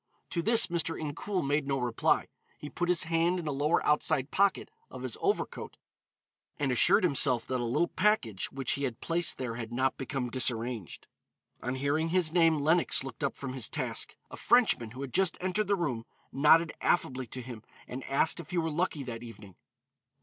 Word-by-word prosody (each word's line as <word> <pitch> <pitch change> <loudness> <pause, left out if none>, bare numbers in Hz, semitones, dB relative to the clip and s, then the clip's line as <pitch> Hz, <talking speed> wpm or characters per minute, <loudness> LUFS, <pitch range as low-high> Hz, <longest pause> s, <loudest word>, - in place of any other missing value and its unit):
To 170 - -1
this 230 +5 +5
Mr. 170 -1 -2
Incoul 160 +4 -3
made 145 0 0
no 135 -1 0
reply. 125 -3 +1 0.3
He 150 - -9
put 175 0 -2
his 180 -2 +3
hand 165 +2 +1
in 175 - -5
a 150 - -2
lower 145 +4 0
outside 150 -2 +1
pocket 200 - +1 0.2
of - - -9
his - - -3
overcoat 405 +1 -2 0.8
and 140 -3 -1
assured 125 - +5
himself 130 -7 +4
that 130 -1 -2
a - - -2
little 150 +9 +1
package 135 - 0
which 135 -2 -2
he 140 - -1
had 125 -3 -5
placed 170 0 0
there 120 -3 -4
had 115 -1 -6
not 130 +2 0
become 135 -2 -4
disarranged. 120 -5 -1 0.6
On 125 +1 -3
hearing 145 +4 0
his 170 -2 +1
name, 165 -3 +4
Lenox 155 0 +2
looked 135 0 -8
up 140 - -1
from 135 -2 -6
his 130 -4 0
task. - - -3 0.2
A - - -8
Frenchman 230 - +2
who 125 +4 -9
had 135 -3 -6
just 190 -2 +1
entered 185 +4 -1
the 200 - +2
room 135 -11 -3 0.2
nodded 155 +3 +4
affably 130 -7 0
to 130 +3 -6
him 120 -3 -9 0.3
and 130 +1 -7
asked 140 +5 +1
if 165 - -9
he 180 - -3
were 165 -1 0
lucky 155 -2 -2
that 115 -3 -7
evening. 110 -5 -12
145 Hz, 195 wpm, -29 LUFS, 125-170 Hz, 0.8 s, this